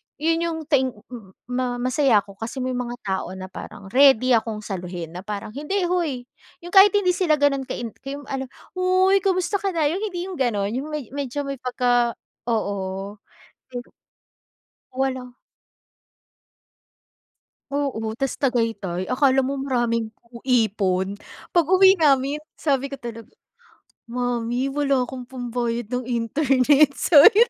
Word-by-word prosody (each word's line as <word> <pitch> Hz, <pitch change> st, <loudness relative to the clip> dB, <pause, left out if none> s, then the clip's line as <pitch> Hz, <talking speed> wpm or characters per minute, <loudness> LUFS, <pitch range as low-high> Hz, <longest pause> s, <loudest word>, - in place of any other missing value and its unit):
yun 325 Hz, +2 st, +1 dB
yung 325 Hz, -1 st, -3 dB
thank 260 Hz, -5 st, +2 dB, 0.6 s
ma-masaya 250 Hz, -2 st, +2 dB
ako, 200 Hz, -1 st, -15 dB
kasi 245 Hz, +3 st, -4 dB
may 255 Hz, -, -1 dB
mga 245 Hz, -1 st, -3 dB
tao 190 Hz, -2 st, -2 dB
na 185 Hz, 0 st, -8 dB
parang 195 Hz, -1 st, -9 dB
ready 260 Hz, -1 st, +5 dB
akong 220 Hz, -2 st, +1 dB
saluhin 180 Hz, -4 st, -5 dB
na 175 Hz, -, -7 dB
parang, 210 Hz, 0 st, -5 dB
"Hindi 300 Hz, -, -2 dB
hoy," 320 Hz, -9 st, -1 dB, 0.4 s
yung 350 Hz, -, -8 dB
kahit 395 Hz, +1 st, +8 dB
hindi 380 Hz, -3 st, +3 dB
sila 350 Hz, -4 st, +2 dB
ganun 275 Hz, -2 st, +1 dB
ka -, -, -3 dB
in 235 Hz, -2 st, -5 dB
kay 275 Hz, +1 st, -6 dB
ano, 270 Hz, -2 st, -5 dB, 0.3 s
"Hoy, 370 Hz, +1 st, +3 dB
kamusta 380 Hz, +1 st, 0 dB
ka 390 Hz, -3 st, -2 dB
na?" 310 Hz, -3 st, +2 dB
yung 365 Hz, -, -2 dB
hindi 360 Hz, -4 st, -3 dB
yung 370 Hz, -5 st, -7 dB
ganun. 210 Hz, -5 st, 0 dB
Yung 265 Hz, +5 st, -3 dB
med 300 Hz, -6 st, -5 dB
medyo 285 Hz, 0 st, -3 dB
may 275 Hz, -2 st, -5 dB
pagka 245 Hz, -2 st, +1 dB, 0.3 s
oo. 200 Hz, -2 st, -2 dB, 0.6 s
Pero 245 Hz, 0 st, -6 dB, 1.0 s
Walang 255 Hz, -1 st, -2 dB, 2.4 s
Oo. 235 Hz, -7 st, -1 dB
Tas 270 Hz, +3 st, -2 dB
Tagaytay, 225 Hz, -9 st, -1 dB
akala 270 Hz, 0 st, +3 dB
mo 275 Hz, +1 st, -2 dB
maraming 235 Hz, -4 st, -1 dB, 0.2 s
u 235 Hz, -, -10 dB
ipon. 200 Hz, -5 st, +1 dB, 0.3 s
Pag-uwi 375 Hz, +3 st, +5 dB
namin, 280 Hz, -2 st, +3 dB, 0.2 s
sabi 275 Hz, -2 st, -1 dB
ko -, -, -2 dB
talaga, 230 Hz, -1 st, -7 dB, 0.8 s
"Mommy 245 Hz, +1 st, -1 dB
wala 275 Hz, -2 st, +1 dB
akong 250 Hz, 0 st, -5 dB
pambayad 240 Hz, -2 st, -3 dB
ng 250 Hz, 0 st, -2 dB
internet. 270 Hz, +4 st, +3 dB
Sorry 295 Hz, -2 st, +7 dB
na." 480 Hz, -, +5 dB
255 Hz, 140 wpm, -23 LUFS, 230-290 Hz, 2.4 s, kahit